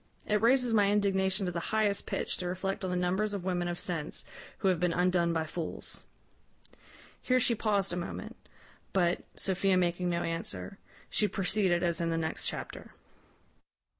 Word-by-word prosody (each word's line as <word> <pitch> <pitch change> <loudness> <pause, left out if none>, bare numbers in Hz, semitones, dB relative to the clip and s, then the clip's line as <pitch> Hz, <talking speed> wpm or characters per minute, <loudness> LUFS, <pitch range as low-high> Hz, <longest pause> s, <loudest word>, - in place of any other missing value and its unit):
It 210 -1 +1
raises 245 0 +4
my 205 -2 +5
indignation 195 -1 +2
to 180 - -1
the 170 - -2
highest 215 -2 +1
pitch - - -2
to 180 - -3
reflect 195 +3 -2
on 185 - -1
the 180 - -1
numbers 190 +4 +1
of 195 - -4
women 180 -1 0
of 175 0 -2
sense 160 -4 -3 0.3
who 195 - 0
have 180 -3 +2
been 175 -1 +2
undone 180 -1 +2
by 160 -1 0
fools." 160 +1 -5 1.2
Here 255 0 +3
she 245 -1 +3
paused 200 -4 +1
a - - -1
moment; 175 -1 -5 0.6
but, 175 -2 +2
Sophia 190 0 +2
making 180 0 +1
no 170 0 0
answer, 100 - -4 0.3
she 210 - +3
proceeded 190 -3 +1
as 170 -1 +1
in 170 - 0
the 165 - 0
next 160 -1 -2
chapter. - - -5
185 Hz, 170 wpm, -31 LUFS, 175-200 Hz, 1.2 s, my